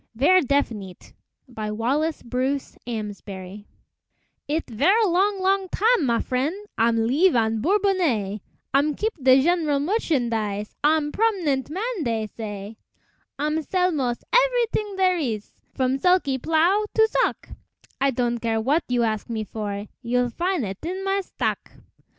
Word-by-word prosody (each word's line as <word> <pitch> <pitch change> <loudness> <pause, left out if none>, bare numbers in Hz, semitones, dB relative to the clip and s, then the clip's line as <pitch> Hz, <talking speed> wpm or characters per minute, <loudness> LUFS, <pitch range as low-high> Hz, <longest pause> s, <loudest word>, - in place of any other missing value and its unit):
VERRE 360 +10 +5
DEFINITE 230 -9 -2 0.3
BY 220 -4 -5
WALLACE 275 +9 -1
BRUCE 260 +3 -2
AMSBARY 205 -3 -6 0.8
It' 315 +3 -1
verre 365 - +3
long, 390 +2 +2
long 385 0 +1
tam', 435 - +2
ma 235 -1 +2
frien', 290 +11 -2
I'm 230 0 +2
leeve 310 +9 +3
on 225 -1 +1
Bourbonnais, 335 - +1 0.3
I'm 285 +2 +2
keep 440 +1 -1
de 260 0 +6
gen'rale 320 -4 +2
merchandise, 235 - -1
I'm 300 0 +2
prom'nent 345 - 0
man, 405 +3 -3
dey 225 -3 -1
say; 210 -1 -7 0.6
I'm 300 +2 0
sell 365 +3 +1
mos' 255 -6 -2
every - - +4
t'ing 415 -2 -2
dere 370 -2 +2
ees, 225 -8 -3 0.2
From 260 0 0
sulky 350 -6 +2
plow 335 - +2
to 445 0 +5
sock, - - -1 0.5
I 275 - +4
don' 240 -2 -1
care 225 -1 -1
w'at 280 +9 +1
you 245 -1 +2
ask 215 -1 -2
me 220 -2 -2
for, 205 -1 -5 0.2
You'll 245 0 0
fin' 350 +1 -1
it 195 -2 -5
in 370 +4 -4
my 390 0 +1
stock. - - -3
275 Hz, 145 wpm, -24 LUFS, 225-365 Hz, 0.8 s, de